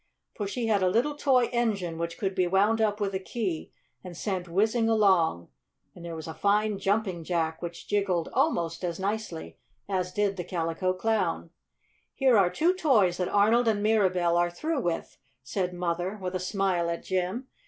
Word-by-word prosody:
For 205 Hz, -, -4 dB
she 235 Hz, +4 st, -3 dB
had 210 Hz, -3 st, +2 dB
a 185 Hz, -, +3 dB
little 240 Hz, +9 st, +1 dB
toy 265 Hz, -4 st, +3 dB
engine, 200 Hz, -9 st, -1 dB
which 170 Hz, 0 st, -3 dB
could 195 Hz, -2 st, -2 dB
be 185 Hz, -2 st, +1 dB
wound 205 Hz, +5 st, +2 dB
up 210 Hz, -1 st, +1 dB
with 200 Hz, -1 st, -1 dB
a 190 Hz, -, -1 dB
key 190 Hz, -4 st, -4 dB, 0.3 s
and 180 Hz, -2 st, -9 dB
sent 185 Hz, -4 st, -3 dB
whizzing 220 Hz, +5 st, +2 dB
along. 190 Hz, -, +3 dB, 0.4 s
And 175 Hz, -, -12 dB
there 170 Hz, -1 st, -6 dB
was 160 Hz, 0 st, -7 dB
a 160 Hz, -, -5 dB
fine 205 Hz, +1 st, +1 dB
Jumping 195 Hz, -4 st, 0 dB
Jack, 160 Hz, -1 st, -1 dB
which 170 Hz, -1 st, -7 dB
jiggled 195 Hz, -5 st, 0 dB
almost 165 Hz, +1 st, 0 dB
as 170 Hz, -1 st, -3 dB
nicely 200 Hz, -4 st, -4 dB, 0.3 s
as 185 Hz, -2 st, -1 dB
did 200 Hz, -1 st, 0 dB
the 175 Hz, -, -3 dB
Calico 170 Hz, +1 st, -1 dB
Clown. 185 Hz, -5 st, -1 dB, 0.6 s
"Here 265 Hz, -3 st, +4 dB
are 195 Hz, -4 st, +5 dB
two 325 Hz, -, +2 dB
toys 225 Hz, -, +3 dB
that 180 Hz, -, -1 dB
Arnold 225 Hz, +4 st, +3 dB
and 210 Hz, -2 st, +1 dB
Mirabell 185 Hz, -5 st, +2 dB
are 175 Hz, 0 st, +2 dB
through 305 Hz, -, -2 dB
with," 170 Hz, -4 st, -3 dB, 0.3 s
said 180 Hz, +6 st, -2 dB
Mother, 180 Hz, +2 st, -2 dB
with 185 Hz, -1 st, -4 dB
a 185 Hz, -, -1 dB
smile 180 Hz, -2 st, 0 dB
at 170 Hz, -, -3 dB
Jim. 185 Hz, +7 st, -2 dB
190 Hz, 185 wpm, -27 LUFS, 175-215 Hz, 0.6 s, are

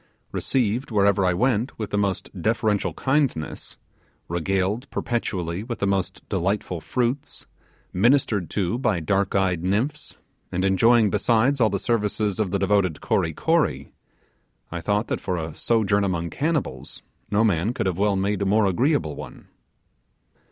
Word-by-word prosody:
Received 125 Hz, +1 st, -1 dB
wherever 100 Hz, -3 st, +3 dB
I 90 Hz, -1 st, +2 dB
went 120 Hz, +3 st, 0 dB
with 110 Hz, -2 st, -5 dB
the 105 Hz, -, 0 dB
most 100 Hz, -2 st, -2 dB
deferential 110 Hz, 0 st, 0 dB
kindness; 135 Hz, -, -1 dB, 0.5 s
regaled 95 Hz, -, -1 dB
perpetually 95 Hz, -6 st, -2 dB
with 120 Hz, 0 st, -5 dB
the -, -, -1 dB
most 100 Hz, -2 st, -2 dB
delightful 95 Hz, -2 st, -1 dB
fruits; 125 Hz, -, -2 dB, 0.5 s
ministered 105 Hz, -, +2 dB
to 100 Hz, +3 st, -1 dB
by 110 Hz, -9 st, +1 dB
dark 95 Hz, +4 st, 0 dB
eyed 90 Hz, -3 st, +1 dB
nymphs, 125 Hz, +11 st, -2 dB, 0.3 s
and 90 Hz, +2 st, 0 dB
enjoying 110 Hz, +3 st, +4 dB
besides 125 Hz, +6 st, +2 dB
all 110 Hz, -, +5 dB
the 100 Hz, -, -1 dB
services 105 Hz, -2 st, -1 dB
of 105 Hz, -3 st, +1 dB
the -, -, 0 dB
devoted 100 Hz, -6 st, +1 dB
Kory 80 Hz, -, 0 dB
Kory, 80 Hz, -, 0 dB, 0.8 s
I 85 Hz, 0 st, -4 dB
thought 105 Hz, +5 st, 0 dB
that, -, -, -2 dB
for 90 Hz, -2 st, -2 dB
a 80 Hz, -1 st, -4 dB
sojourn 105 Hz, -1 st, +1 dB
among 85 Hz, -4 st, -1 dB
cannibals, 150 Hz, -, -3 dB, 0.3 s
no 105 Hz, +2 st, +2 dB
man 100 Hz, -1 st, +2 dB
could 125 Hz, -, -3 dB
have 95 Hz, -1 st, -1 dB
well 100 Hz, -1 st, +2 dB
made 100 Hz, +1 st, 0 dB
a -, -, +1 dB
more 105 Hz, +2 st, +3 dB
agreeable 95 Hz, -, +1 dB
one. -, -, -10 dB
100 Hz, 150 wpm, -24 LUFS, 95-115 Hz, 0.8 s, all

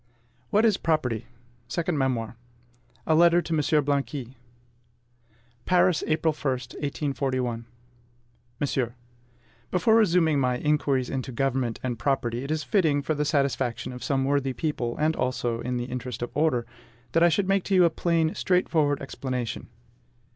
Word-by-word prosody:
WHAT 215 Hz, +3 st, +3 dB
IS 215 Hz, -4 st, +3 dB
PROPERTY? 125 Hz, -9 st, -1 dB, 0.4 s
SECOND 170 Hz, +5 st, -1 dB
MEMOIR 130 Hz, -5 st, -1 dB, 0.7 s
A 160 Hz, -, +2 dB
LETTER 170 Hz, +2 st, +6 dB
TO 170 Hz, -1 st, -3 dB
M. 160 Hz, -, +2 dB, 0.3 s
BLANQUI. 140 Hz, 0 st, 0 dB
SECOND 125 Hz, 0 st, -10 dB
MEMOIR. 120 Hz, -1 st, -35 dB
PARIS, 180 Hz, -2 st, +3 dB
April 155 Hz, 0 st, +1 dB
1, 145 Hz, -2 st, -1 dB
1841. 130 Hz, -2 st, -3 dB, 0.9 s
MONSIEUR, 130 Hz, -4 st, -1 dB, 0.7 s
Before 185 Hz, +5 st, +3 dB
resuming 170 Hz, -8 st, +4 dB
my 125 Hz, -2 st, +1 dB
"Inquiries 140 Hz, -3 st, 0 dB
into 130 Hz, -1 st, -3 dB
Government 130 Hz, -2 st, -1 dB
and 120 Hz, -3 st, -3 dB
Property," 120 Hz, -2 st, -1 dB
it 140 Hz, -, -6 dB
is 155 Hz, -1 st, -1 dB
fitting, 150 Hz, -5 st, +2 dB
for 155 Hz, -, 0 dB
the 150 Hz, 0 st, -1 dB
satisfaction 135 Hz, -4 st, 0 dB
of 125 Hz, -, -8 dB
some 135 Hz, -1 st, 0 dB
worthy 135 Hz, -1 st, +1 dB
people, 125 Hz, -3 st, -2 dB
and 155 Hz, +1 st, +1 dB
also 120 Hz, -2 st, -1 dB
in 125 Hz, +1 st, -2 dB
the 120 Hz, -, -2 dB
interest 125 Hz, -1 st, -5 dB
of 120 Hz, -, -4 dB
order, 145 Hz, -6 st, +1 dB, 0.5 s
that 165 Hz, -, +2 dB
I 170 Hz, -, +6 dB
should 185 Hz, +4 st, +1 dB
make 195 Hz, -1 st, +2 dB
to 195 Hz, -, +1 dB
you 180 Hz, -1 st, +6 dB
a 170 Hz, -, +3 dB
plain, 165 Hz, -1 st, +1 dB
straightforward 155 Hz, -6 st, +1 dB
explanation. 130 Hz, -3 st, -4 dB
135 Hz, 155 wpm, -26 LUFS, 120-160 Hz, 0.9 s, LETTER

